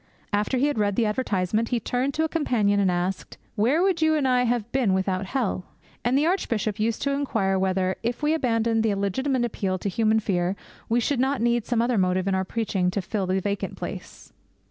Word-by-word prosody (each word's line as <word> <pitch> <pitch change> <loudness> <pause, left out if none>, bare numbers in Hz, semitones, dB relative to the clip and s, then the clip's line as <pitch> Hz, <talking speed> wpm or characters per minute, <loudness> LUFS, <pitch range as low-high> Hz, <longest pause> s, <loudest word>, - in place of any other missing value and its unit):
After 210 +5 +1
he 260 - +2
had 290 -6 0
read 205 -1 +1
the 230 - +2
advertisement 215 -1 0
he 245 - +1
turned 250 +5 -1
to 315 - +1
a - - +2
companion 230 -11 +1
and 195 -2 +3
asked, 180 +1 -2 0.2
'Where 250 - +2
would 375 -4 +1
you 315 0 +4
and 290 -3 +1
I 250 -1 +3
have 235 -1 -1
been 240 -8 +2
without 190 0 -1
hell?' 220 -6 -1 0.4
And 245 +3 +2
the 295 - +2
Archbishop 230 - -1
used 220 +1 0
to 280 - +1
inquire 220 -9 0
whether, 190 0 0
if 240 +5 -3
we 300 +1 +3
abandoned 230 -6 +1
the 220 -2 +1
legitimate 240 +6 0
appeal 195 -5 -2
to 200 - -3
human 220 +2 +2
fear, 185 -3 0 0.3
we 235 +1 +3
should 260 +2 0
not 265 +1 +1
need 235 0 +1
some 235 -2 +1
other 240 -3 +1
motive 185 0 +1
in 195 - +1
our 190 0 +1
preaching 190 -3 -1
to 190 - -2
fill 195 +1 -2
the 190 +1 +1
vacant 200 +1 -3
place. - - -8
225 Hz, 215 wpm, -25 LUFS, 195-255 Hz, 0.4 s, you